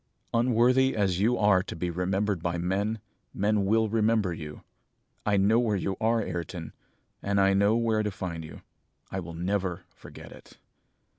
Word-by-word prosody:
Unworthy 125 +2 +3
as 95 -4 +1
you 115 +5 +2
are 105 -3 +4
to - - -7
be 85 +1 -2
remembered 95 +2 -1
by 85 0 -1
men, 100 +6 -1 0.4
men 105 0 +1
will 110 +2 +3
remember 110 -3 +1
you. 75 -2 -8 0.6
I 105 -1 +3
know 105 +4 +4
where 115 -4 +1
you 95 0 -2
are, 115 +1 +2
Ayrton, 85 -1 -5 0.5
and 100 0 0
I 100 0 +4
know 100 +3 +3
where 115 -2 +1
to 105 - -1
find 90 -4 -5
you. 80 - -11 0.5
I 95 - -2
will 85 -2 -7
never 90 0 -2
forget - - -12
it!' - - -15
100 Hz, 165 wpm, -27 LUFS, 90-110 Hz, 0.6 s, are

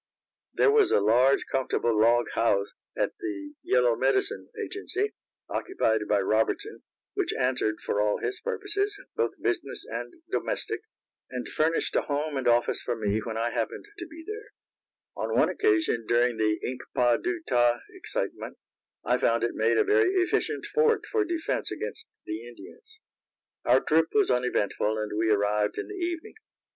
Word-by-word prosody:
There - - +5
was 430 -2 +5
a - - +5
large 120 +6 +4
comfortable 125 -3 0
log 115 +3 +4
house 100 -3 +2 0.3
at - - 0
the 335 -5 -5
Yellow 480 +7 +3
Medicine 400 +3 +1
agency, 405 0 -2 0.3
occupied 110 - 0
by 100 -1 +3
Robertson, 110 - 0 0.3
which 395 -3 0
answered 125 -4 +1
for 105 - 0
all 105 0 +2
his 400 - -3
purposes, 410 -3 -1 0.2
both - - -1
business - - -2
and - - -5 0.2
domestic, 430 +2 -2 0.5
and 125 -1 -4
furnished 160 +2 0
a - - +4
home 145 0 -2
and 135 -2 -1
office 120 0 +3
for 120 - -2
me 105 -1 0
when 110 0 -4
I 115 +1 0
happened 115 -2 -3
to 350 - -6
be 325 0 -11
there; 430 +2 -7 0.6
and - - -2
on - - +1
one - - +4
occasion, 325 - +1
during 120 0 +2
the 110 -1 +2
Ink 125 0 -4
pa 120 -1 +4
du 355 -1 -2
ta 120 0 +3
excitement, 435 +6 -4 0.5
I - - +2
found - - +2
it - - 0
made - - +2
a 430 - +5
very 425 0 +4
efficient 370 +2 0
fort 455 -2 +2
for 435 -1 +1
defense 340 -3 -2
against 445 - -5 0.2
the 110 +3 -5
Indians. 435 - -13 0.7
Our - - +5
trip 160 +1 +3
was 210 -7 +3
uneventful, 110 -3 0
and 105 -1 -3
we 110 +1 +1
arrived 105 0 +1
in - - -4
the - - -6
evening. 345 +1 -4
155 Hz, 165 wpm, -27 LUFS, -, 0.7 s, There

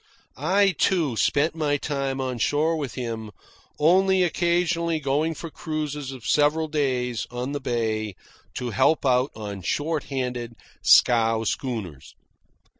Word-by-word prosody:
I, 195 +7 +3
too, 165 -7 +1
spent 145 +7 +2
my 150 -3 0
time 140 -2 -2
on 130 -2 -3
shore 155 +6 +1
with 145 -6 -4
him, 115 -3 -4 0.5
only 185 +4 +4
occasionally 170 -1 +1
going 150 +3 0
for 165 0 -7
cruises 150 -4 -4
of 130 -4 -10
several 150 +2 +2
days 130 -6 -1
on 125 +2 -4
the 145 0 -3
bay 110 -4 -2 0.4
to 125 -1 -3
help 150 +9 +2
out 130 +1 +3
on 100 -3 -6
short 150 - -1
handed 125 -3 -4 0.3
scow 115 -2 +5
schooners. 105 - -4
140 Hz, 130 wpm, -24 LUFS, 120-160 Hz, 0.5 s, scow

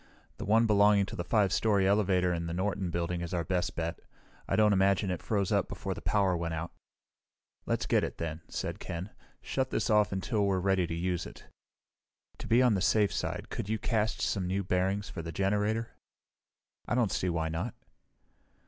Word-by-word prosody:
The - - -5
one 110 +3 +4
belonging 105 -1 +5
to - - -8
the 85 - -3
5 100 0 +2
story 100 -4 +2
elevator 95 -3 +2
in 85 -1 -3
the 85 - -3
Norton 95 0 -1
Building 85 +1 -2
is 85 +1 -3
our 85 - 0
best 90 +1 -1
bet. 85 0 -3 0.5
I - - +1
don't 105 -1 +4
imagine 95 0 +2
it 90 - -3
froze 100 -3 -1
up - - +1
before - - -4
the - - -9
power 100 -3 +2
went 85 -1 -2
out." 80 +2 -4 1.0
"Let's - - 0
get - - +2
it - - -4
then," 80 0 -4
said - - -4
Ken. 90 +4 -5 0.3
"Shut 130 -1 -1
this - - 0
off 105 -1 +4
until 100 +3 -1
we're 95 -1 +2
ready 95 -1 +1
to 80 - -3
use 90 0 -2
it. - - -13 0.9
To - - -7
be 120 +3 +5
on 125 -3 +4
the 95 - 0
safe 105 +1 +3
side, - - -3
could 95 - -4
you 110 - +1
cast 110 -1 -1
some 95 -3 0
new 95 +2 -1
bearings 95 +3 0
for 85 - -6
the 85 0 -6
generator?" 105 +5 0 1.0
"I - - 0
don't 120 -5 +2
see 90 - 0
why 80 -1 -1
not." 85 +9 -3
95 Hz, 200 wpm, -30 LUFS, 85-105 Hz, 1.0 s, belonging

